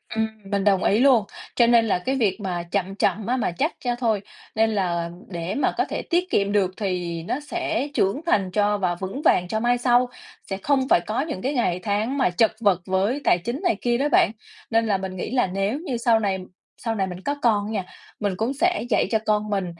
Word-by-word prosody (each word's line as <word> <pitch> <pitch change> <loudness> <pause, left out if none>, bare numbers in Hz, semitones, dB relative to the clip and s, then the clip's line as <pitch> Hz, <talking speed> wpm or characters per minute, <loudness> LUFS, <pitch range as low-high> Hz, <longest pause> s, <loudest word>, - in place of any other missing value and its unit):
Ừm, 220 0 +1 0.2
mình 200 -1 +1
đồng 195 -2 +3
ý 210 +3 +3
luôn, 250 -6 +5 0.3
cho 235 -1 +5
nên 235 -1 +5
là 190 -4 +1
cái 265 +9 -1
việc 210 -7 +1
mà 175 -3 -3
chậm 195 -1 -1
chậm 210 0 0
á 255 +2 +1
mà 215 - 0
chắc 290 - -1
ra 240 0 +1
thôi, 225 -5 0 0.3
nên 225 0 +3
là 175 -5 -1 0.2
để 170 0 -4
mà 285 - +1
có - - +2
thể - - -3
tiết 360 +1 0
kiệm 200 0 +1
được 195 -3 +2
thì 175 -4 -3
nó 255 - -2
sẽ 295 -3 -2
trưởng 200 +9 +1
thành 195 - +1
cho 205 +1 +2
và 180 -3 0
vững 195 - -5
vàng 180 -10 +3
cho 220 +4 -1
mai 240 +1 +2
sau, 245 0 +3 0.4
sẽ 195 - -2
không 270 -2 +2
phải - - +6
có 215 +8 -2
những 280 - -4
cái 275 +3 -1
ngày 180 -8 0
tháng 215 +7 -1
mà 260 -8 +3
chật 215 +5 +3
vật 190 -4 +3
với 200 +9 0
tài - - +4
chính 235 - -4
này 290 - +2
kia 240 -1 +1
đó 290 +3 +1
bạn. - - +4 0.4
Nên 225 0 +2
là 200 -2 +2
mình 190 0 -5
nghĩ 185 - -4
là 245 -7 +2
nếu 195 +8 -1
như 270 -8 -3
sau 230 -1 +3
này 195 -3 0 0.4
sau 225 -1 -2
này 190 -2 0
mình 180 0 -7
có 285 +5 -2
con 210 -4 +2
á 220 - -5
nha, 195 -4 -2 0.3
mình 205 -2 0
cũng 225 +5 -1
sẽ 350 +1 +1
dạy - - +2
cho 220 - +3
con 210 0 +1
mình 195 -3 0
215 Hz, 240 wpm, -23 LUFS, 190-245 Hz, 0.4 s, phải